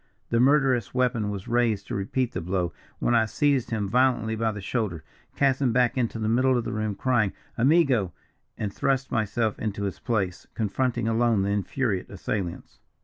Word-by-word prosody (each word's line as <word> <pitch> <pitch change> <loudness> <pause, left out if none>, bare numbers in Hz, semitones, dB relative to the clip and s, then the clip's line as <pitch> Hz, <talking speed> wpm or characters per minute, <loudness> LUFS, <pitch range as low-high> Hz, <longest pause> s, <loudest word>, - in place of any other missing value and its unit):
The 115 - +3
murderous 130 -4 +3
weapon 120 -4 +1
was 100 -2 -5
raised 115 -4 +1
to - - -6
repeat 115 +6 -1
the - - -4
blow, 90 -1 -1 0.2
when 120 - +1
I 115 -1 +4
seized 140 +1 +1
him 110 -3 -1
violently 120 -1 +2
by 110 0 0
the 105 - -6
shoulder, 95 -5 -2 0.3
cast 135 -1 +2
him 130 -3 +3
back 125 0 +2
into 120 -3 -1
the 110 -1 -2
middle 130 +3 +3
of 120 - -1
the - - -4
room, 110 -1 -2
crying, 110 -4 +1 0.2
'Amigo,' 130 - +3 0.5
and 100 -3 -3
thrust 135 -1 0
myself 110 0 0
into 100 -2 -3
his 100 -2 -3
place, 95 -7 -2
confronting 120 +2 -1
alone 115 -2 +2
the 100 - 0
infuriate 100 0 -1
assailants. 95 -5 -5
115 Hz, 180 wpm, -26 LUFS, 100-125 Hz, 0.5 s, I